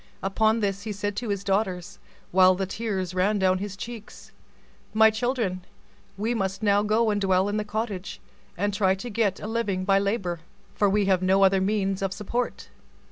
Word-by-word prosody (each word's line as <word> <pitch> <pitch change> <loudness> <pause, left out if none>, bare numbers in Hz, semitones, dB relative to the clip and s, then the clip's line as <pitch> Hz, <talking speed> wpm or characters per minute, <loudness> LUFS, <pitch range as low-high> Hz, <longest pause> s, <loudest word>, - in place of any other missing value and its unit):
Upon 220 +3 +2
this 200 -1 -1
he 215 - -5
said 205 0 -3
to 235 -1 -3
his 200 -1 -2
daughters, 190 -3 -1 0.3
while 185 0 +6
the 190 +1 -2
tears 190 -3 -3
ran 195 +3 +1
down 185 -1 +2
his 200 -1 -5
cheeks, 230 0 -9 0.6
"My 220 0 +6
children, 220 -5 -1 0.6
we 220 +4 -1
must 195 -1 -2
now 205 -1 +4
go 215 +1 +2
and 205 -1 -1
dwell 190 0 +2
in 205 +1 -1
the 210 - 0
cottage, 210 -3 -4 0.4
and 205 +2 0
try 190 -2 +2
to 235 +5 -7
get 205 -3 0
a - - -7
living 210 -4 -1
by 195 0 +4
labor, 195 -4 -1 0.3
for 205 - +2
we 205 +1 +2
have 190 -2 +2
no 190 +1 +3
other 190 0 +4
means 195 -1 0
of 195 -1 -1
support." 235 +5 -3
200 Hz, 190 wpm, -25 LUFS, 190-215 Hz, 0.6 s, while